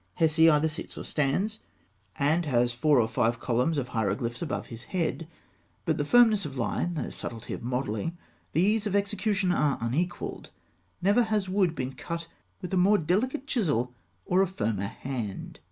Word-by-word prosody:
Hesi 160 0 +5
either 150 0 +4
sits 155 +1 -6
or - - -5
stands 185 +10 0 0.6
(fig. - - -11
184), 145 +2 +4
and 175 0 -1
has 120 -3 +2
four 140 +3 +3
or 110 - +3
five 115 0 +1
columns 125 +7 +1
of 125 -3 -2
hieroglyphs 115 +1 -1
above 160 - -3
his 115 -1 -9
head; 165 -4 -2 0.6
but - - 0
the - - +2
firmness 225 +1 +5
of 140 -4 -6
line, 170 +8 -1
the 155 - -3
subtlety 115 -2 -6
of - - -5
modelling, 125 +5 -2 0.4
the 165 - +3
ease 210 +2 +2
of 200 - -1
execution, 200 -1 +1
are 150 -6 +2
unequalled. 150 +10 -2 0.5
Never 205 +5 +5
has 210 -3 0
wood 185 -3 +2
been 130 -2 -3
cut 170 +3 -5 0.4
with 180 - -5
a - - +3
more 195 +4 +5
delicate 220 - 0
chisel 145 - 0 0.3
or 185 +2 +3
a 195 - +3
firmer 105 - -2
hand. 115 -5 -5
160 Hz, 180 wpm, -28 LUFS, 125-190 Hz, 0.6 s, Hesi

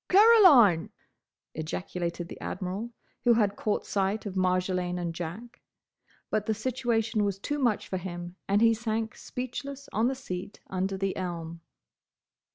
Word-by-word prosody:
"Caroline—!" 365 - +7 0.6
ejaculated 170 +2 -4
the - - -10
Admiral, 190 +5 -4 0.3
who 240 - +6
had 205 -3 +2
caught 210 0 -1
sight 200 +2 -1
of 200 - -4
Marjolaine 185 -1 +1
and 170 -1 -3
Jack. 185 +9 -7 0.7
But 215 -1 0
the 220 - +1
situation 230 -2 0
was 200 -2 0
too 290 +9 -3
much 240 -6 +1
for 190 - -2
him, 175 -1 -6
and 200 +2 +3
he 230 0 +6
sank 220 -1 -2
speechless 275 +3 -6
on 220 +4 +2
the 265 - 0
seat 190 -6 -6
under 190 +1 -1
the 195 0 -1
elm. 170 -2 -5
200 Hz, 145 wpm, -28 LUFS, 180-235 Hz, 0.7 s, Caroline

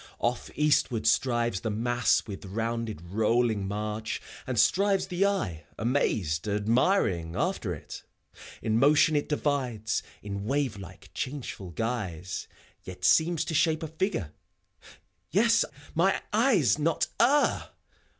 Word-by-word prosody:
Off 120 +1 -1
eastward 145 -7 +2
strives 120 -2 +2
the 110 - -2
mass 120 +3 +1
with 100 -2 -7
rounded, 115 -1 -3
rolling 110 -1 +1
march: 105 +2 -3 0.3
And - - -1
strives 195 0 +3
the 180 +3 +1
eye, 90 - -2
amazed, 105 - 0
admiring, 105 - +1
after 130 - -1
it. - - -9 0.6
In 110 +1 +1
motion 150 +3 +5
it 145 - 0
divides, 130 -7 -1 0.2
in 100 0 -5
wave 135 -2 0
like, 95 -3 -12
changeful 130 -8 -5
guise; 95 -4 -4 0.4
Yet 90 -1 -6
seems 165 0 +3
to - - -4
shape 160 0 +2
a - - -2
figure. 160 - -2 0.5
— - - -21 0.2
^Yes 230 +2 +5
I - - -14 0.2
mine 190 +4 +2
eyes 210 - +3
not 160 +2 +1 0.2
err 285 +5 +3
120 Hz, 130 wpm, -28 LUFS, 105-155 Hz, 0.6 s, motion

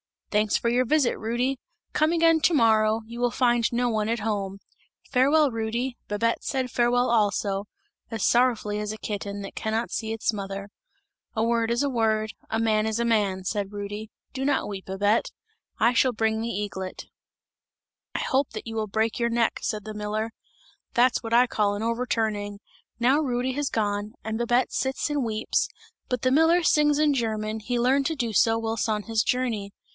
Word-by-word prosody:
"'Thanks 210 0 +2
for 235 - +1
your 250 +2 +2
visit, 285 -1 +2
Rudy! 245 +4 -1 0.3
Come 310 +2 +2
again 330 -1 +4
to 335 - +3
morrow, 220 -4 +4
you 235 +2 -9
will 245 0 +2
find 240 -2 +2
no 245 +1 +1
one 215 -2 0
at 230 +1 0
home. 200 -2 -2 0.5
Farewell, 280 +3 +4
Rudy!' 235 +3 -2
Babette 230 +3 0
said 260 -2 -2
farewell 245 +1 +2
also, 205 -3 +1 0.4
as 225 -3 -3
sorrowfully 235 -4 +2
as 210 0 -3
a - - -7
kitten, 205 -1 -4
that 195 - -8
cannot 220 +2 -2
see 220 -1 -3
its 225 - 0
mother. 200 0 -5 0.7
'A 220 - +1
word 230 0 +1
is 235 +4 +1
a 285 - +1
word, 220 -3 +1 0.2
a 220 - 0
man 220 -1 +2
is 220 0 -1
a 235 - +1
man,' 205 -5 +1
said 205 +1 -2
Rudy, 205 +1 -5 0.2
'do 270 0 -3
not 285 -5 +1
weep 195 -2 -6
Babette, 205 +3 +1 0.5
I 235 +2 +5
shall 250 +1 +3
bring 220 0 0
the 230 - -2
eaglet!' 195 -3 -4 1.1
'I - - 0
hope 265 +1 0
that 215 - -7
you 225 -1 -6
will 215 -1 -1
break 220 +3 0
your 235 0 +1
neck!' 230 -1 +1
said 210 -1 -2
the 215 - -7
miller. 210 +1 -3 0.6
That's 245 +1 +3
what 230 -1 -4
I 245 +2 +6
call 210 -4 0
an 205 - -4
overturning! 220 -3 -1 0.4
Now 260 +5 +4
Rudy 255 -3 0
has 280 +1 -1
gone, 205 -1 -1
and 220 0 -3
Babette 240 +1 +2
sits 265 +2 -1
and 285 -4 0
weeps; 220 -1 0 0.4
but 250 - -2
the 255 - +2
miller 325 +5 +4
sings 295 -2 +4
in 300 -1 +3
German, 220 -3 -2
he 245 +3 -2
learned 265 +3 +2
to 320 - -2
do 240 -5 -2
so 225 +2 +4
whilst 225 0 -1
on 210 -1 0
his 225 0 +1
journey! 225 -6 -1
225 Hz, 190 wpm, -26 LUFS, 215-250 Hz, 1.1 s, I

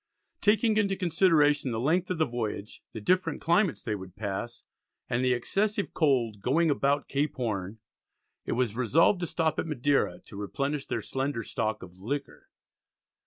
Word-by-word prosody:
Taking 215 +1 +3
into 200 -2 +2
consideration 160 -6 +3
the 115 -2 -2
length 170 +8 +1
of 180 - -1
the 160 - +3
voyage, 110 -4 -4
the 110 - -6
different 185 - +1
climates 170 -1 +2
they 115 -4 -2
would 95 -3 -7
pass, 110 +3 -4 0.4
and 120 +2 0
the 130 -1 +3
excessive 200 - -1
cold 120 - +1
"going 155 +8 +2
about 140 0 +1
Cape 145 +2 -1
Horne," 110 -5 -3 0.7
it - - -2
was 120 -3 0
resolved 155 - +3
to 175 - -2
stop 160 -1 0
at - - -2
Madeira 145 -1 +1
to 100 - -11
replenish 140 +7 -2
their - - -2
slender 135 -3 -2
stock 110 0 -2
of 90 0 -13
"liquor." 140 +8 -5
140 Hz, 165 wpm, -28 LUFS, 115-165 Hz, 0.7 s, Taking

